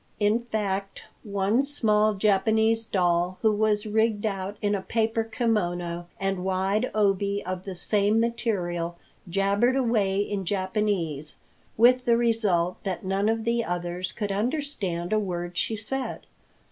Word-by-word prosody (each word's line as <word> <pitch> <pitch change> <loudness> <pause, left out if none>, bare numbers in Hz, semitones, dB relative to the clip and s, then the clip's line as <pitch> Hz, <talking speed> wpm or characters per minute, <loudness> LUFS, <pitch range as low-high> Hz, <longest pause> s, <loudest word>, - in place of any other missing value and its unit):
In 210 +2 +3
fact, 200 -3 -3 0.2
one 200 +3 +1
small 215 -7 +2
Japanese 220 +3 +2
doll 180 -2 +1
who 220 -1 +4
was 210 0 +2
rigged 220 0 +1
out 195 -1 -3
in 205 0 0
a 200 - -1
paper 225 +2 0
kimono 175 -7 -1
and 195 -1 -1
wide 190 +5 0
obi 200 -1 +1
of 185 0 -4
the 190 -2 -5
same 205 +4 +1
material, 180 -8 -1 0.3
jabbered 200 +7 +2
away 225 -7 +1
in 205 -1 -1
Japanese, 185 -6 -1 0.4
with 250 +3 +5
the 235 -1 +4
result 210 -7 +1
that 190 -1 -4
none 195 +3 +1
of 225 0 0
the 235 +1 +1
others 175 0 -3
could 205 -3 -3
understand 210 - -2
a 215 - +3
word 175 -3 -4
she 220 - 0
said. 255 +5 -4
205 Hz, 140 wpm, -26 LUFS, 185-225 Hz, 0.4 s, with